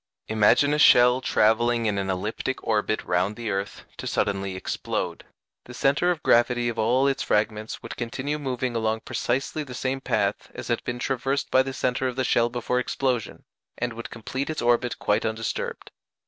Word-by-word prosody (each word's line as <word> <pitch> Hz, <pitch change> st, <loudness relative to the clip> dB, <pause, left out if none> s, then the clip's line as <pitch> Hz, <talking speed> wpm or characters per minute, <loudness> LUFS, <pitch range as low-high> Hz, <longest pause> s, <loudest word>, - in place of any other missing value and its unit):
Imagine 115 Hz, +7 st, +4 dB
a 150 Hz, -, +1 dB
shell 125 Hz, -2 st, +6 dB
travelling 115 Hz, 0 st, +2 dB
in 105 Hz, -2 st, 0 dB
an 95 Hz, 0 st, -2 dB
elliptic 105 Hz, +7 st, -3 dB
orbit 110 Hz, -1 st, 0 dB
round 90 Hz, +4 st, 0 dB
the 115 Hz, -2 st, -4 dB
earth 100 Hz, +1 st, -4 dB
to -, -, -6 dB
suddenly 95 Hz, -1 st, -1 dB
explode: 95 Hz, -, -3 dB, 0.4 s
the 125 Hz, -, -10 dB
centre 140 Hz, +6 st, +2 dB
of 170 Hz, -3 st, -1 dB
gravity 120 Hz, 0 st, +3 dB
of 115 Hz, -1 st, -4 dB
all 125 Hz, +5 st, +3 dB
its 135 Hz, -1 st, 0 dB
fragments 105 Hz, +1 st, -1 dB
would -, -, -7 dB
continue 130 Hz, +5 st, -3 dB
moving 130 Hz, -3 st, -2 dB
along 110 Hz, 0 st, 0 dB
precisely 135 Hz, +5 st, -2 dB
the 130 Hz, -3 st, -9 dB
same 135 Hz, +2 st, -2 dB
path 100 Hz, -5 st, -1 dB
as -, -, -7 dB
had 120 Hz, -, 0 dB
been 120 Hz, -, -3 dB
traversed 135 Hz, +2 st, -1 dB
by 130 Hz, -, +6 dB
the 135 Hz, 0 st, -3 dB
centre 130 Hz, 0 st, -1 dB
of 125 Hz, -, -3 dB
the 130 Hz, -, 0 dB
shell 120 Hz, -1 st, +2 dB
before 125 Hz, +1 st, -1 dB
explosion, 125 Hz, -2 st, -2 dB, 0.3 s
and 120 Hz, 0 st, -2 dB
would 115 Hz, +1 st, -7 dB
complete 130 Hz, +5 st, -4 dB
its 155 Hz, -, -3 dB
orbit 120 Hz, 0 st, +1 dB
quite 105 Hz, -, +1 dB
undisturbed. 110 Hz, 0 st, -3 dB
120 Hz, 180 wpm, -25 LUFS, 110-130 Hz, 0.4 s, shell